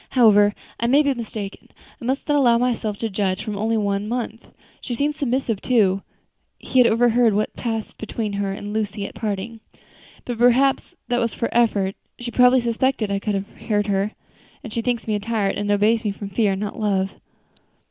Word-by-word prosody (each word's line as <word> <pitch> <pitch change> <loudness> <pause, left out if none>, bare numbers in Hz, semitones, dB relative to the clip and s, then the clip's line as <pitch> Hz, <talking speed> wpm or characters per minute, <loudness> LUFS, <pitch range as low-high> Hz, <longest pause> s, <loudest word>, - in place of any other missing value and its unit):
"However, 205 -3 +6 0.2
I 235 - +1
may 280 +5 +5
be 285 -1 +2
mistaken; 215 -4 -7 0.3
I - - -7
must 265 +3 -1
not 295 - +2
allow 245 -5 +5
myself 230 -4 -1
to 225 - -2
judge 190 -1 -1
from 215 - -4
only 220 +2 0
one 200 -1 -1
month. 235 -2 -4 0.3
She 245 - -4
seems 290 +4 0
submissive, 250 -6 -1
too," 200 -6 +2 0.6
he 260 - 0
had 245 - +7
overheard 235 -1 +3
what 210 - -1
passed 225 -2 -4
between 220 -1 -3
her 200 -1 -1
and 205 +1 -6
Lucy 210 -2 -2
at - - -8
parting 215 +1 -4 0.7
"but 240 -2 -4
perhaps 265 +7 +3
that 245 0 +2
was 230 -1 -1
for 230 - -1
effect; 205 -5 +1 0.2
she 240 0 -6
probably 250 +1 +5
suspected 235 -2 0
I 200 - 0
could 200 -1 -2
hear 210 -2 0
her 200 +1 0 0.5
and 225 -5 -8
she 230 - -1
thinks 235 -1 -2
me 215 - 0
a 210 - 0
tyrant, 205 -2 -1
and 205 0 -2
obeys 210 +2 +3
from 205 -2 -4
fear, 200 -1 +1
not 205 +3 -5
love." 195 -3 0
220 Hz, 190 wpm, -22 LUFS, 205-240 Hz, 0.7 s, had